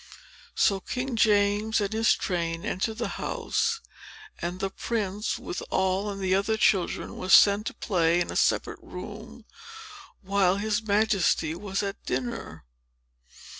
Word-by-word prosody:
So 195 -1 +3
King 250 +6 -4
James 210 0 +3
and 205 0 -2
his 225 +1 +3
train 170 -2 -2
entered 220 +4 -2
the 235 - -2
house; 460 0 -1 0.6
and 175 +1 -3
the 195 0 -2
prince, 210 -1 -2
with - - -6
Noll 190 +2 +1
and 195 -1 -5
some 185 - +3
other 220 +2 -1
children, 190 -4 +1
was 185 +1 +5
sent 205 +1 +5
to - - -5
play 170 -4 +1
in 175 - -2
a - - -6
separate - - +1
room - - -9 0.8
while 195 -1 +2
his 210 +1 0
Majesty 205 -6 +2
was 195 +3 -3
at 200 0 -5
dinner. 125 - -4
200 Hz, 140 wpm, -27 LUFS, 185-215 Hz, 0.8 s, was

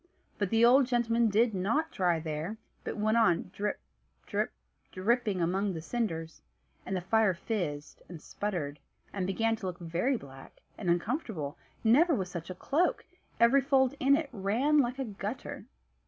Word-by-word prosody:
But 200 -3 0
the 225 +2 +5
old 255 +2 +6
gentleman 235 -2 +2
did 220 +2 +3
not 230 - 0
dry 175 -4 +1
there, 160 +6 -4 0.3
but - - -4
went 215 +2 +2
on 180 -5 +2
drip, 205 +1 -2 0.5
drip, - - -1 0.4
dripping 210 -1 0
among 190 +3 0
the 160 - -5
cinders, 165 -8 -3 0.5
and 190 - -1
the 185 - -1
fire 205 +1 +2
fizzed, 165 -7 -4
and 175 -2 -8
sputtered, 155 -7 -4 0.3
and 190 -2 -2
began 225 +4 +1
to 205 -3 -5
look 180 -1 -4
very 175 +11 0
black, 135 -6 -13 0.2
and 185 - -3
uncomfortable: 175 - -1 0.3
never 295 +9 +5
was 185 -4 -3
such 170 0 -6
a 185 - -5
cloak; 305 - 0 0.3
every 235 +4 +6
fold 265 -1 +3
in 275 +1 +5
it 300 -1 -2
ran 235 +9 +2
like 250 -1 +1
a 270 - -2
gutter. 210 +2 -6
210 Hz, 165 wpm, -30 LUFS, 175-240 Hz, 0.5 s, old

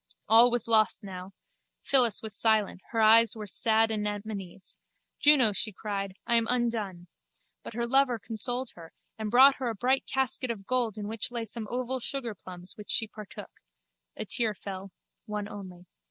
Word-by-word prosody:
All 230 +3 +6
was 240 -1 -2
lost 220 -2 +3
now. 190 0 -9 0.5
Phyllis 245 -7 +3
was 220 -2 -4
silent: 215 -3 +1
her 225 - -1
eyes 225 +1 +6
were 215 -1 -7
sad 225 +2 +2
anemones. 205 -3 -5 0.4
Juno, 285 -7 +7
she 215 +2 -2
cried, 200 -1 -5
I 235 - +3
am 230 -1 +1
undone. 225 -8 -1 0.6
But - - -10
her 235 0 -1
lover 260 0 +2
consoled 245 +4 -4
her 165 -1 -14 0.3
and 215 -1 -3
brought 265 +4 +6
her 255 -3 -2
a 225 - -4
bright 255 +6 0
casket 265 -1 0
of 210 -4 -5
gold 240 -3 -1
in 205 -1 -5
which 220 0 -3
lay 240 -1 -4
some 220 0 -4
oval 255 +1 -3
sugarplums 205 -9 -6
which 210 - -11
she 220 - +2
partook. 215 -1 -12 0.6
A - - -4
tear 225 -3 +1
fell: 195 0 -8 0.4
one 210 -1 -4
only. 185 -4 -10
220 Hz, 170 wpm, -28 LUFS, 205-240 Hz, 0.6 s, Juno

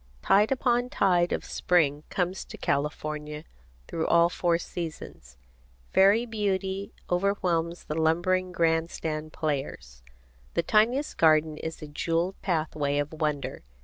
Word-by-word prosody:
Tide 210 +4 +4
upon 245 -2 +1
tide 175 -5 +2
of - - -2
Spring 150 -5 +1
comes 185 +1 -1
into - - -11
California 150 +1 -2 0.4
through 160 - -2
all 170 0 +5
four 175 -1 +1
seasons. 160 - -7 0.6
Fairy 200 +5 +5
beauty 195 -3 -2 0.2
overwhelms 175 -3 0
the - - -4
lumbering 175 +4 +1
grand 165 -1 +1
stand 155 -1 -4
players. 135 - -4 0.5
The 170 - +2
tiniest 235 - +2
garden 155 -1 +4
is 160 -1 -6
a - - -6
jewelled 165 +5 -1
pathway 155 -5 -1
of 145 +1 -2
wonder. 150 -3 -2
170 Hz, 125 wpm, -27 LUFS, 155-190 Hz, 0.6 s, all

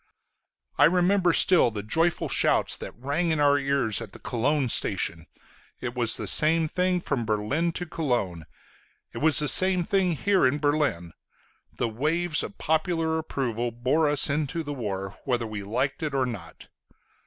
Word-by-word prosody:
I - - +7
remember 180 +2 +2
still 175 -4 +4
the 105 -2 -6
joyful 165 - 0
shouts - - +1
that - - -9
rang 145 +8 -2
in 160 -2 0
our 145 0 +3
ears 135 -6 +1
at 105 -3 -9
the - - -12
Cologne 135 +3 -1
station; 85 -6 +1 0.5
it 120 -1 -5
was 120 -2 +1
the - - -5
same 160 +1 +3
thing 180 +2 -1
from 140 -7 -2
Berlin 110 +11 -1
to 175 - -4
Cologne; 120 - -3 0.7
it - - -6
was 155 -1 +2
the 150 - +2
same 185 +3 +6
thing 185 0 0
here 195 +5 +1
in 135 +3 -1
Berlin. 145 - -1 0.6
The 120 - -1
waves 155 +8 -1
of 200 - -8
popular 160 0 -1
approval 120 -6 -3
bore 130 +7 0
us 145 -1 +4
into 150 +2 -2
the 145 -1 -6
war, 100 -6 -6
whether 120 -3 -1
we 110 -2 -6
liked 130 +7 -3
it 150 -3 -3
or 130 -1 +1
not. 100 -10 -9
145 Hz, 165 wpm, -25 LUFS, 115-165 Hz, 0.7 s, I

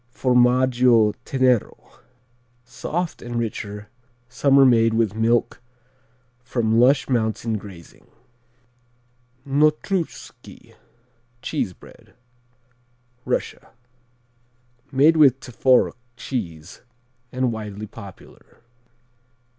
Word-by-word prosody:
Formaggio 125 -3 +3
Tenero: 130 -4 -1 0.7
soft 160 +8 -5
and 120 0 -7
richer, 105 -2 -5 0.4
summer 135 +2 +3
made 115 -3 +3
with 110 -3 +1
milk 115 +3 0 0.8
from 115 -3 0
lush 130 +3 +3
mountain 115 -2 -1
grazing. 95 -5 -14 1.4
Notruschki 155 +5 -2 0.7
(cheese 125 -10 -3
bread) - - -19 1.1
Russia - - -3 1.2
Made 150 +4 +4
with 135 -4 +5
Tworog 125 0 +2 0.2
cheese 90 - -6 0.5
and 130 -1 -1
widely 105 -2 -7
popular. 100 0 -15
120 Hz, 75 wpm, -22 LUFS, 110-130 Hz, 1.4 s, with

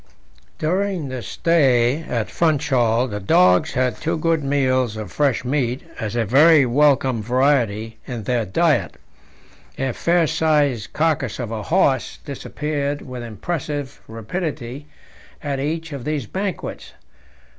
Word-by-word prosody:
During 180 -2 -1
the 130 -1 -5
stay 130 - +2
at 120 -8 -2
Funchal 130 -7 +2
the 105 -3 -4
dogs 90 -2 +4
had 125 -3 0
two 165 - -2
good 165 -1 +1
meals 130 -5 +1
of 110 -1 -6
fresh 140 -4 0
meat 130 -1 -1 0.2
as 110 +1 -3
a 115 -1 +1
very 145 - +6
welcome 130 -2 +3
variety 115 -3 +1
in 120 -4 -5
their 120 +1 0
diet; 95 -3 +1 0.8
a 135 -1 -1
fair 170 +4 +2
sized 150 -7 +1
carcass 155 -7 0
of 120 -3 -5
a 110 -1 -3
horse 140 - +1
disappeared 145 +1 -3
with 125 -2 -7
impressive 140 - -5
rapidity 135 - -5 0.6
at 140 -2 -2
each 160 +2 -3
of 140 -4 -6
these 150 -3 -2
banquets. 190 - -5
135 Hz, 130 wpm, -21 LUFS, 120-155 Hz, 0.8 s, very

